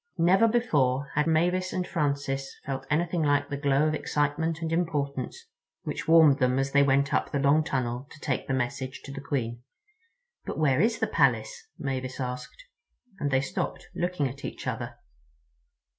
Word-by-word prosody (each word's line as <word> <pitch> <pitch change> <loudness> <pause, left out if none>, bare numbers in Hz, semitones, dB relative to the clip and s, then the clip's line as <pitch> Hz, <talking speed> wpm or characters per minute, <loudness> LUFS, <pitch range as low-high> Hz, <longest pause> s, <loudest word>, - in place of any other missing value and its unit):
Never 190 +7 +5
before 145 - +1
had 150 +2 +1
Mavis 180 +3 +2
and 180 - -1
Francis 140 -5 -2
felt 135 -1 -4
anything 170 +2 +1
like 145 -1 +2
the - - -1
glow 140 +1 +2
of 155 - 0
excitement 155 +2 -1
and 165 0 -1
importance 145 -6 -2 0.4
which - - -4
warmed 160 -4 +6
them 125 0 +2
as 135 0 0
they 140 - +5
went 140 0 +3
up - - +1
the 145 - 0
long 140 +3 +4
tunnel 130 -2 -2
to - - -14
take 135 -4 -2
the - - -1
message 130 +1 -3
to 140 - -8
the 140 0 -6
Queen. 120 -6 -3 0.8
"But - - -5
where 150 -2 +3
is 230 +2 +2
the - - +1
Palace?" - - +1
Mavis 130 -2 -3
said, 125 -1 -3 0.8
and 145 - 0
they 130 -1 +2
stopped, 135 - -4
looking 175 -5 -1
at 135 +2 -9
each - - -6
other. 120 -1 -4
140 Hz, 175 wpm, -27 LUFS, 135-160 Hz, 0.8 s, warmed